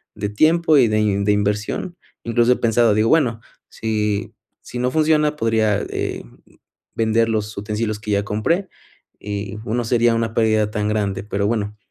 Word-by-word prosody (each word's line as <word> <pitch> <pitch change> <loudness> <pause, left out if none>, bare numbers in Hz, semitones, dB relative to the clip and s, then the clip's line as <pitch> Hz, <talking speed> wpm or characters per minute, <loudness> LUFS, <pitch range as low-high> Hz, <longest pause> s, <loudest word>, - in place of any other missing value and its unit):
de 105 -1 -3
tiempo 155 +8 +3
y 125 -4 +5
de 105 -2 +1
de 105 - +3
inversión. 105 - -1 0.3
Incluso 120 +1 +2
he - - -2
pensado, 115 -1 +3
digo: 110 +2 +2
"Bueno, 125 -8 +2 0.3
si 105 -2 -2 0.3
si - - -8
no 125 +1 0
funciona, 155 0 +2
podría 110 -4 +1
eh, - - -3 0.7
vender 115 0 +2
los 110 -1 -2
utensilios 105 +1 -3
que 105 0 -5
ya 100 0 +1
compré 165 - -1 0.5
y 105 0 -5
no 120 +2 -1
sería 120 0 +3
una 115 -1 -1
pérdida 110 -2 +2
tan 105 0 -1
grande". 100 -2 -1
Pero, 100 -1 -1
bueno, 105 -2 -2
110 Hz, 160 wpm, -20 LUFS, 105-120 Hz, 0.7 s, y